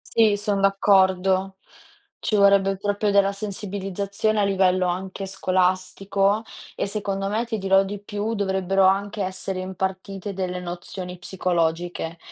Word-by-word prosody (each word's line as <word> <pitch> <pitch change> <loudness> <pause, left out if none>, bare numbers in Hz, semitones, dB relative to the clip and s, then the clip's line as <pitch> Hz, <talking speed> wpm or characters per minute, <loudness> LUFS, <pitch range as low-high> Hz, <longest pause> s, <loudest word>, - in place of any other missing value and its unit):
Sì, 215 -3 +5
son 205 -1 0
d'accordo. 190 -1 +3 0.6
Ci 215 - -1
vorrebbe 200 -1 +4
proprio 205 +1 0
della 200 0 +4
sensibilizzazione 200 +1 -2
a - - +3
livello 185 -2 +2
anche 190 +2 -4
scolastico, 185 +2 +1 0.3
e - - -2
secondo 195 -1 -2
me, 220 +3 -1
ti 225 -2 -3
dirò 195 0 +4
di 195 +1 -5
più, 205 +2 -3
dovrebbero 190 -2 +1
anche 200 +2 +1
essere 190 0 -3
impartite 190 +1 -4
delle 180 -1 -3
nozioni 180 +1 -7
psicologiche, 175 -2 -1
195 Hz, 125 wpm, -23 LUFS, 185-200 Hz, 0.6 s, Sì